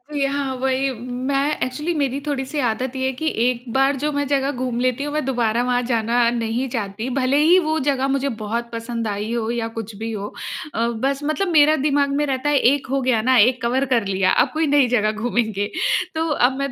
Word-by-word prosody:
यहाँ 275 -1 -1
वही 265 +1 0 0.4
मैं 280 +2 0
एक्चुअली 300 +7 -2
मेरी 275 -2 0
थोड़ी 270 -2 -1
सी 290 +2 -4
आदत 250 +4 -3
ये 260 - -1
है 265 - +1
कि 315 +5 -4 0.2
एक 245 -1 0
बार 270 +1 +3
जो 300 - +1
मैं 285 0 -1
जगह 275 0 +1
घूम 250 -3 -3
लेती 255 +2 0
हूँ 295 0 -4
मैं 305 -1 0
दोबारा 240 -3 +1
वहाँ 245 0 +1
जाना 230 +1 +1 0.2
नहीं 230 +3 -1
चाहती, 220 +1 -4
भले 260 +2 +2
ही 330 +5 +5
वो 315 -1 0
जगह 270 -1 0
मुझे 275 0 -1
बहुत 235 +3 -3
पसंद 230 0 -4
आई 210 +2 -3
हो 230 -1 -1
या 235 -1 -2
कुछ 220 -2 -6
भी 225 +2 -5
हो। 205 -1 -5 0.4
अ, 230 +1 0 0.2
बस 275 0 0
मतलब 310 +6 0
मेरा 300 +1 +6
दिमाग 285 -1 +2
में - - +1
रहता 270 +1 -1
है 290 - +3 0.2
एक 280 -2 -3
हो 275 - +1
गया 250 -4 +2
ना, 255 +2 +3
एक 250 +4 +4
कवर 255 +3 +1
कर 230 -3 +2
लिया 190 -1 +2
अब - - -5
कोई 315 0 +1
नई 280 -3 +4
जगह 215 0 +1
घूमेंगे। 220 -2 -1 0.4
तो 320 +1 0 0.2
अब 265 - -7
मैं 275 -1 -2
260 Hz, 225 wpm, -21 LUFS, 230-280 Hz, 0.4 s, मेरा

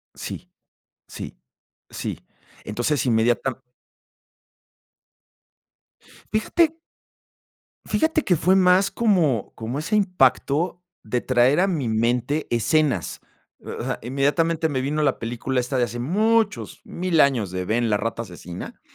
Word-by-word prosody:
Sí, - - -7 0.6
sí, - - -8 0.5
sí. - - -5 0.5
Entonces 120 +7 -1
inmediata 120 +3 +1 2.7
Fíjate 320 +9 +2 1.1
Fíjate 315 -1 +1
que 180 - +3
fue 185 +5 +3
más 185 +1 +4
como 170 - +1
como 115 +5 -4
ese 165 +8 -1
impacto 175 -2 +2 0.2
de 120 +3 -1
traer 130 +4 +3
a 195 - +3
mi 155 -10 -1
mente 120 +6 0
escenas. 125 - +1 0.4
O - - -6
sea, - - -3
inmediatamente 155 +6 +1
me 130 -2 -1
vino 150 +3 -1
la 140 -3 +1
película 120 +3 -2
esta 125 +2 -2
de 125 - +3
hace 120 0 -6
muchos 210 - +1
1000 175 -2 -1
años, 125 -8 +2
de 90 0 -3
Ben, 115 +3 +1
la 105 - +2
rata 115 +2 -3
asesina 90 -3 -9
135 Hz, 120 wpm, -23 LUFS, 120-180 Hz, 2.7 s, más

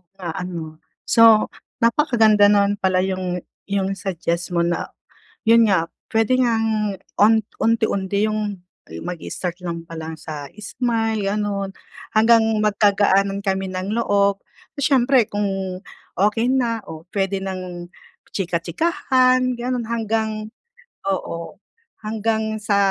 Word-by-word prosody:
Na 175 -4 -5
ano? 165 -3 -6 0.2
So, 225 -2 +5 0.3
napakaganda 225 -5 +4
nun 205 0 +3
pala 185 -1 +2
yung 185 -2 -2 0.2
yung 195 -1 0
suggest 175 -2 -2
mo 170 - +3
na 175 0 -1 0.6
yun 230 -1 +6
nga, 190 -4 +4 0.3
pwede 225 +2 +2
ngang 225 -4 +1 0.2
un 215 +2 +7 0.3
unti-unti 200 -3 +1
yung 215 0 -1 0.6
mag-start 180 0 -5
lang 170 -1 -3
palang 160 -1 -6
sa 150 -2 -6 0.2
smile 225 -3 0
ganun 200 -1 -1 0.5
hanggang 225 +1 +6 0.2
magkagaanan 200 -1 +2
kami 190 -1 -1
ng 185 +1 -4
loob. 200 -2 +2 0.4
Siyempre 260 -3 +3
kung 205 -1 -1 0.8
okey 225 +3 0
na 245 -3 +1
o 160 0 -8
pwede 195 -1 0
ng 180 -2 -6 0.4
chika-chikahan 255 - +1
ganon 250 -1 -2
hanggang 220 -1 -2 0.6
oo, 175 -3 -4 0.4
hanggang 220 0 -1 0.2
sa, 205 -1 +2
205 Hz, 110 wpm, -21 LUFS, 185-225 Hz, 0.8 s, un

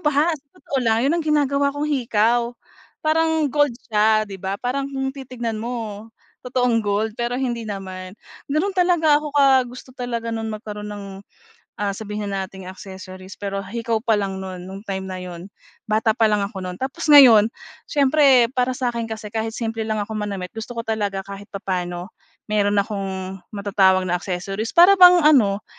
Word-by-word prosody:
ba 300 +2 +3
sa 280 - -23
totoo 275 - -4
lang 225 0 +3
'yon 315 +5 +2
ang 330 - -2
ginagawa 280 -2 +2
kong 290 +1 -3
hikaw, 235 -2 +1 0.5
parang 320 -1 +2
gold 290 0 +2 0.2
siya, 215 0 +3
'di 195 - -7
ba? 190 +1 -4
Parang 265 +3 -1
kung 270 0 -2
titignan 240 -4 -5
mo 225 -2 -5 0.3
totoong 245 -2 +1
gold 210 +1 -1
pero 240 +2 -2
hindi 240 -3 -2
naman. 190 -1 -7 0.3
Gano'n 365 +7 0
talaga 345 -4 +3
ako 300 -1 -6
ka 270 -2 +5
gusto 250 +1 -11
talaga 235 -2 -4
no'n 225 0 -3
magkaroon 210 -1 -6
ng 205 -1 -7 0.8
ah 200 -1 -1
sabihin 210 -1 -5
na 195 -1 -2
nating 190 -1 -10
accessories, 185 0 -10
pero 195 -1 -3
hikaw 230 +2 -2
pa 230 - +2
lang 195 -2 -2
no'n 185 -2 -7
nung 195 +2 -9
time 190 -2 -4
na 185 - -5
'yon, 180 +1 -8 0.4
bata 220 +1 +2
pa 225 - +4
lang 210 -1 +1
ako 200 -1 -6
no'n. 180 0 -5
Tapos 275 +5 -4
ngayon 245 -8 +8 0.4
siyempre 275 -4 +4
para 255 0 0
sa 255 -2 0
akin 230 -1 -4
kasi 220 -1 -6
kahit 225 0 -2
simple 225 -1 -3
lang 215 -1 -1
ako 220 - -9
manamit 200 -3 -4
gusto 225 +2 -7
ko 230 - -3
talaga 205 -3 -2
kahit 200 +1 -9
papaano 180 -1 -4 0.4
meron 205 -1 +1
akong 195 -2 -3
matatawag 190 -2 +3
na 180 -1 0
accessories 195 +4 -4
para 360 +4 +8
bang 360 -1 +9
ano 215 -10 +4
220 Hz, 175 wpm, -22 LUFS, 195-260 Hz, 0.8 s, bang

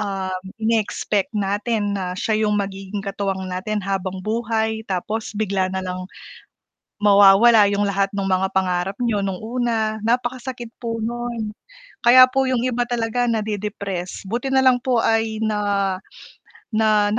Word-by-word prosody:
um, 195 -2 -3 0.2
ine-expect 220 -2 0
natin 205 +1 -1
na 185 -2 -3
siya 215 +2 0
yung 210 - +1
magiging 195 0 -4
katuwang 195 -1 -3
natin 185 +2 -3
habang 190 -1 -3
buhay 220 0 -1
tapos 210 +4 -3
bigla 195 -3 0
nalang, 185 0 -4 1.0
mawawala 205 +2 +7
yung 205 0 +1
lahat 200 0 +1
nung 195 -1 -1
mga 190 +1 +2
pangarap 185 0 0
niyo 230 -3 +1
nung 195 -1 -2
una, 225 -2 -1
napakasakit 245 0 -2
po 230 -1 -3
nun. 235 -2 -3 0.6
Kaya 255 +1 +10
po 270 0 +1
yung 255 -2 +1
iba 245 -1 0
talaga 240 0 0
nadi-depress, 205 -4 -3
buti 240 +3 -2
nalang 265 -2 +4
po 250 -3 +1
ay 225 -1 +1
na, 205 -3 0 0.7
na 215 -2 +3
210 Hz, 135 wpm, -21 LUFS, 195-230 Hz, 1.0 s, Kaya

